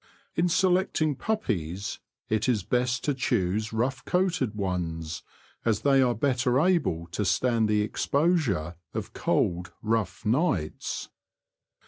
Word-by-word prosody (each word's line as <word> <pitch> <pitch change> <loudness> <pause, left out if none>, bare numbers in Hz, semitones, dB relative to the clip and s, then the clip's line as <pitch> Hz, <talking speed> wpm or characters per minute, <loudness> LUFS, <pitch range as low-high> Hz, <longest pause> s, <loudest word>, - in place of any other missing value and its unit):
In 175 +2 +2
selecting 180 -4 +2
puppies 100 - -2 0.3
it 110 +3 +1
is 110 -6 +1
best 125 +2 0
to 145 - +1
choose 110 -5 0
rough 125 +4 -1
coated 170 - 0
ones, 85 -5 -3 0.4
as 110 -3 +1
they 135 -1 +4
are 125 -2 +3
better 125 0 +2
able 160 - +2
to 105 - -1
stand 110 +4 +2
the 105 0 +3
exposure 115 - 0 0.2
of - - -4
cold, 85 0 0
rough 110 -2 -1
nights. 110 - 0
115 Hz, 120 wpm, -27 LUFS, 95-140 Hz, 0.4 s, they